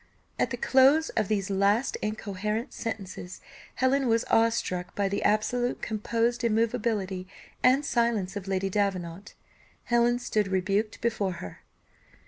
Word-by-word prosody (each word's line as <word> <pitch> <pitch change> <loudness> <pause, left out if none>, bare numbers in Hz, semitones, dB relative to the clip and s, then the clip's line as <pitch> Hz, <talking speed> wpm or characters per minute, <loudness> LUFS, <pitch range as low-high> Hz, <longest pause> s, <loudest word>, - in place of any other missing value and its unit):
At - - +2
the - - -4
close 275 +5 +4
of 215 -3 -1
these 200 -2 -1
last 200 +6 +2
incoherent 215 +2 -3
sentences, 190 -5 -6 0.4
Helen 265 +1 +2
was 230 0 +2
awe 225 0 +5
struck 180 -6 -3
by 200 -1 +1
the 200 +1 -2
absolute 245 +4 0
composed 230 +2 -1
immovability 220 -5 0 0.3
and 265 +3 +4
silence 230 -7 0
of 200 -1 -5
Lady 195 0 -1
Davenant. 190 -2 -2 0.5
Helen 240 0 +2
stood 215 -4 0
rebuked 195 +3 -1
before 215 -5 0
her. 90 - -9
215 Hz, 130 wpm, -27 LUFS, 195-235 Hz, 0.5 s, awe